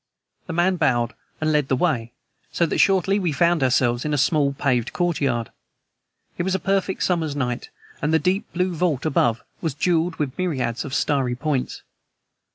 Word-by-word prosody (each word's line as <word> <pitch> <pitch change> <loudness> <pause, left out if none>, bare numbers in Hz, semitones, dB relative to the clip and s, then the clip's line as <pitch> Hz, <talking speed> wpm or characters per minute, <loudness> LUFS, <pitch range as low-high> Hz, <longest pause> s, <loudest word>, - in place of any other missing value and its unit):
The 175 - -4
man 180 +2 +2
bowed 120 -6 +1 0.3
and 155 0 +1
led 150 -3 +2
the 130 - +2
way, 125 -6 0 0.4
so 170 - +2
that 160 - -2
shortly 195 +1 +3
we 180 -4 0
found 170 +1 +2
ourselves 125 -2 +2
in 150 -1 0
a - - 0
small, 145 0 +2
paved 125 -4 0
courtyard. 140 - 0 0.9
It - - +2
was 190 +2 0
a - - 0
perfect 195 0 0
summer's 160 -5 0
night, 125 -3 -2 0.3
and 150 - 0
the 160 - +5
deep 185 +4 -1
blue 180 +1 0
vault 160 -5 0
above 120 -6 +1 0.2
was 160 -6 -2
jeweled 170 +1 +1
with 145 -4 -3
myriads 130 -10 -1
of 140 -1 -4
starry 135 -4 +1
points. 135 -1 -2
150 Hz, 175 wpm, -23 LUFS, 130-175 Hz, 0.9 s, the